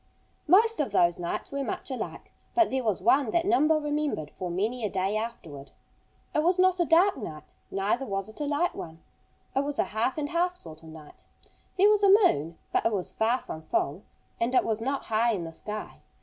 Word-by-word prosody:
Most 445 +7 +5
of 280 -8 0
those 175 -3 +3
nights 175 -1 -4
were 280 0 -2
much 255 - -4
alike. 260 - -6 0.2
But 345 -2 +4
there 265 -1 -1
was 210 -5 -1
one 265 +2 +4
that 335 +8 +1
Nimble 320 -5 +3
remembered 295 - -2
for 180 - -3
many 215 +8 -2
a 210 - 0
day 195 +2 -1
afterward. 175 -11 -6 0.6
It 300 - +2
was 350 +3 +2
not 370 0 +3
a 345 - +3
dark 350 +5 +4
night; 155 -1 -8 0.2
neither 205 +7 -1
was 195 -1 -3
it 220 +7 -11
a - - 0
light 300 +5 0
one. 160 0 -9 0.5
It 270 - +2
was 285 0 -3
a - - +3
half 230 +6 0
and 290 -1 -2
half 355 +2 0
sort 160 - -11
of 160 - -13
night. 155 -2 -14 0.5
There 390 +2 +6
was 420 -1 +4
a 400 - +6
moon. 170 - +4 0.2
But - - +2
it - - -1
was 195 -4 -3
far 235 +3 +1
from 160 - -7
full. 155 +1 -1 0.4
And 235 +3 0
it - - +4
was 225 -1 -1
not 270 +3 -2
high 225 +2 +2
in 185 -5 -3
the 165 0 -7
sky. 210 +5 -7
235 Hz, 215 wpm, -27 LUFS, 190-305 Hz, 0.6 s, There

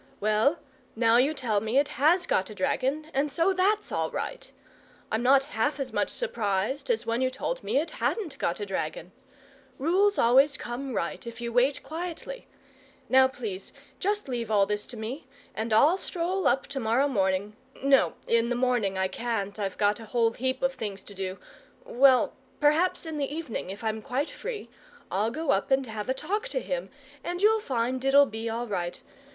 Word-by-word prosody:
Well, 215 +9 +2 0.4
now 230 0 +4
you 275 +5 +3
tell 220 -7 0
me 220 +4 0
it 285 +1 +3
HAS 325 +6 +3
got 190 - +1
a 215 - -9
dragon, 280 +4 -1
and 280 +2 0
so 340 +6 +2
THAT'S 405 +3 +1
all - - 0
right. - - -5 0.6
I'm 220 - +1
not 265 +2 +5
half 285 +7 0
as 270 -2 -4
much - - +1
surprised 235 - -2
as 235 -1 +1
when 230 +2 0
you 260 - +2
told - - -4
me - - 0
it 315 +4 +1
HADN'T 385 -11 -2
got 170 - -1
a 205 - -3
dragon. 180 -2 -4 0.7
Rules 380 +8 +2
always 270 +5 +5
come 255 +2 -5
right 170 +5 -3
if 235 - -7
you 235 -1 -4
wait 255 +4 +2
quietly. 355 +10 -6 0.6
Now, 260 0 +6
please, 220 -7 -6 0.3
just 415 -1 -1
leave 240 -3 -3
this - - -6
all 200 -2 +5
to 210 +4 -4
me. 230 +7 -6 0.3
And 220 +1 -3
I'll 295 - +5
stroll 365 +2 -1
up 270 - +2
to 275 -1 -3
morrow 235 +4 +2
morning 200 -4 0 0.3
no, 275 0 +4
in 230 0 +2
the 245 - 0
morning 240 -6 +1
I 190 0 +2
can't, 215 -2 -3
I've 195 -2 -3
got 205 +1 +2
a 225 - -9
whole 230 0 +2
heap 260 +3 -2
of 265 0 +2
things 205 -6 -5
to 205 - -12
do 190 -1 -4 0.5
well, 260 0 +4 0.3
perhaps 310 +5 +3
in 315 -2 -4
the 280 -1 -1
evening, 305 - -4
if 200 +3 -7
I'm 220 0 -1
quite 275 +5 -2
free, 480 -4 -6 0.4
I'll 205 +4 +1
go 300 +4 -1
up 275 - +1
and 265 0 +3
have 220 -1 -5
a 260 - +1
talk 415 - -2
to - - -2
him, - - -4 0.3
and 350 0 -3
you'll 440 +1 +5
find 255 - -1
it'll 280 +1 +6
be 225 -2 -4
all 230 +2 -2
right. 180 -5 -3
255 Hz, 190 wpm, -27 LUFS, 220-295 Hz, 0.7 s, Now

